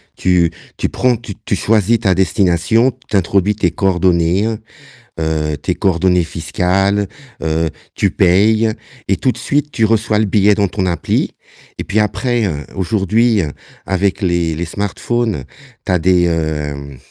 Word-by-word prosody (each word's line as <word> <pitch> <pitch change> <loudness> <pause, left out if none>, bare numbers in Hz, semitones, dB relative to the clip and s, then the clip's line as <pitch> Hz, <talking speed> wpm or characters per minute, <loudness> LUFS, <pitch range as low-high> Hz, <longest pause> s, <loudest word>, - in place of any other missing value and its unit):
Tu 90 -2 +2 0.3
tu - - -1
prends 125 -1 +1
tu 115 -4 -8
tu 100 - -1
choisis 110 +2 +2
ta 95 -3 +3
destination, 95 +5 +2 0.2
tu 105 - +2
introduis 100 +2 +1
tes 90 -6 +1
coordonnées, 90 +1 +2 0.7
heu, 80 -2 -1
tes - - -2
coordonnées 90 -1 +2
fiscales, 95 +4 0 0.3
heu, 80 0 0 0.3
tu 100 - +2
payes 110 +4 +3 0.4
et 95 - +2
tout 130 +7 +1
de - - -11
suite 145 +1 -1
tu 115 - +1
reçois 110 -1 +2
le 110 - +2
billet 105 +1 +3
dans 100 -2 +1
ton 95 0 -2
appli 85 -3 -1 0.5
et - - -3
puis 110 - -1
après, 115 +2 0
heu, 75 -5 -3
aujourd'hui, 105 +3 +2
heu, 75 - -3 0.4
avec 95 +1 0
les 85 -3 +1
les 85 +2 -3
smartphones, 105 - -2 0.4
tu - - -1
as 90 - +3
des, 90 +1 +3
heu, 75 -4 -3
95 Hz, 155 wpm, -16 LUFS, 85-105 Hz, 0.7 s, ta